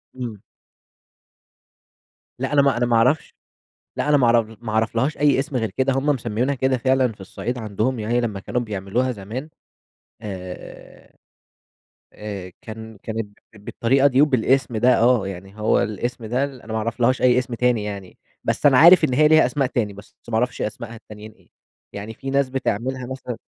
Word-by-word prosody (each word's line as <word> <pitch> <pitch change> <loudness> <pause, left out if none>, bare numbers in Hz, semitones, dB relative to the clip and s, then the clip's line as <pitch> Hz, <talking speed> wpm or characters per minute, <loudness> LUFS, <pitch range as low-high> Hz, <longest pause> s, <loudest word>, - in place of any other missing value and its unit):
إمم. 115 -6 -6 2.0
لأ 135 +2 -2
أنا 145 - +5
ما 140 -3 +2
أنا 120 - +1
ما 120 -1 +1
أعرفش 125 +7 +2 0.6
لأ - - -1
أنا 150 - +5
ما 130 -4 +3
أعرف 115 -2 +2
ما 110 - -4
أعرفلهاش 115 +6 0
أي 145 -1 +3
اسم 140 0 -2
غير 110 -4 -1
كده، 130 0 +2
هم 135 +2 -1
مسميينها 125 -1 0
كده 130 0 +1
فعلًا، 130 -1 +2
في 100 - -20
الصعيد 120 +6 -5
عندهم 110 +3 -2
يعني 120 +3 0
لما 105 -5 -3
كانوا 125 - -2
بيعملوها 110 +3 -2
زمان 115 +8 -7 0.7
آآ، 95 -3 -9 1.0
آآ، 100 -4 -7
كان 110 -2 -9
كانت 110 -2 -5 0.2
بالطريقة 130 +6 +1
دي 135 0 +4
وبالاسم 130 -3 +2
ده 125 +3 +4
آه، 120 -4 +3
يعني 95 +2 -8
هو 105 - +3
الاسم 120 +3 -4
ده 125 +5 0
أنا 130 -5 -8
ما 110 - -1
أعرفلهاش 115 +3 0
أي 125 -1 +5
اسم 125 -1 -2
تاني 120 -3 +1
يعني، 100 -3 -7 0.3
بس - - 0
أنا 135 -3 +6
عارف 170 +5 +8
إن 130 - +1
هي 150 +3 +5
ليها 155 0 +6
أسماء 140 -4 0
تاني، 115 -5 -1
بس 100 +1 -15
ما 115 - -4
أعرفش 125 +3 0
أسماءها 115 +2 -5
التانيين 110 0 -12
إيه، - - -27 0.4
يعني 105 +2 -7
في 135 +4 -6
ناس 140 -1 +2
بتعملها 130 0 -2
مثلًا 130 -2 -6
120 Hz, 175 wpm, -22 LUFS, 110-130 Hz, 2.0 s, عارف